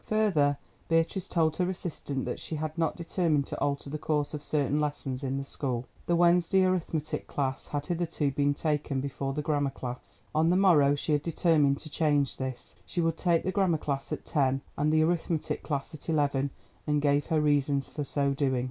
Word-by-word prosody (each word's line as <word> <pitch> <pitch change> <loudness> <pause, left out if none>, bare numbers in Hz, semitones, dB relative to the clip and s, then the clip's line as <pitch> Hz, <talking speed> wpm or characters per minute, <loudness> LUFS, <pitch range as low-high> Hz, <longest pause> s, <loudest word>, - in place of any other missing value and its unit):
Further, 175 -10 +2 0.3
Beatrice 165 +3 +1
told 160 -2 +1
her 180 0 +1
assistant 155 -7 -4
that - - -3
she 160 - -4
had 155 0 -3 0.2
determined 165 -4 0
to - - -6
alter 140 0 -1
the 155 +2 -4
course 150 -1 -1
of 150 -1 -5
certain 145 -1 +1
lessons 145 -3 -3
in 135 0 -1
the 140 - -2
school. 130 -3 -3 0.2
The 175 - +3
Wednesday 175 +2 +4
arithmetic 165 -4 -1
class 135 -2 -2
had 145 0 -3
hitherto 165 -4 -1
been 145 +1 +1
taken 150 -3 -1
before 135 0 -3
the 150 - -3
grammar 145 -2 +1
class. 125 -2 -8
On 160 +2 +3
the 180 - +4
morrow 155 -7 +5
she 145 - -2
had 145 -1 +3
determined 155 -3 +2
to 155 - -9
change 145 -4 +1
this; 130 -2 -5
she - - -5
would 165 -1 +2
take 170 -1 +2
the 185 - 0
grammar 190 -5 +2
class 140 -2 -3
at - - -4
ten 135 -3 +1
and 150 +1 +1
the 155 0 +4
arithmetic 165 -1 -1
class 145 +1 -3
at 155 +2 -8
eleven, 140 -3 +1 0.4
and 150 0 +2
gave 145 0 +2
her 160 - +2
reasons 145 -2 +2
for 150 - -4
so 140 0 0
doing. 135 -2 +1
150 Hz, 195 wpm, -29 LUFS, 140-165 Hz, 0.4 s, morrow